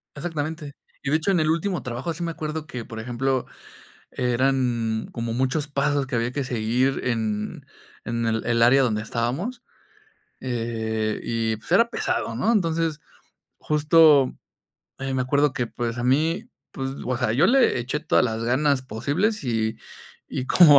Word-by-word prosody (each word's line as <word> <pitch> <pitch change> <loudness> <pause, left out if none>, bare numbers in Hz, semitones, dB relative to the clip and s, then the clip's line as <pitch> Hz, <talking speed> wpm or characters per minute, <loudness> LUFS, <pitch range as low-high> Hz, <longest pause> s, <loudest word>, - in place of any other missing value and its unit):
Exactamente. 155 -3 -4 0.3
Y 140 - -2
de - - +4
hecho, 160 +5 0
en 185 - +3
el 155 0 +2
último 170 0 0
trabajo, 125 +7 -3
sí 170 +2 -5
me 170 - -1
acuerdo 155 -1 -4
que, 125 -4 -6
por 110 -1 -8
ejemplo, 125 +2 -1 0.7
eran 125 -3 0
como 115 -1 -3
muchos 130 +4 0
pasos 140 -1 0
que 130 -2 -2
había 115 +2 0
que 140 0 -2
seguir 125 +2 0
en 110 -3 -2 0.4
en 115 +1 -2
el 115 0 0
el 115 0 +2
área 135 +3 +6
donde 110 -4 0
estábamos, 135 - -2 0.8
eh, 110 -3 -2
y 115 -1 -1
pues, 110 - -15
era 230 +5 +5
pesado, 115 - -1
¿no?, 200 - +1
entonces, 165 -6 0 0.6
justo, 150 -2 +5 0.7
eh, 135 0 -2
me 130 - +1
acuerdo 140 +2 +2
que, 125 -1 -1
pues, 120 0 -4
a 120 - -2
mí, 160 - +1 0.2
pues, 135 0 -4
o 130 0 -1
sea, 120 -3 0
yo 150 +9 +4
le 250 - +4
eché 130 +5 -2
todas 155 -4 +2
las 115 -1 -2
ganas 130 +2 +2
posibles, 150 - -1
y 110 -3 -1 0.5
y 130 - -3
como 150 -6 +8
130 Hz, 165 wpm, -24 LUFS, 115-155 Hz, 0.8 s, como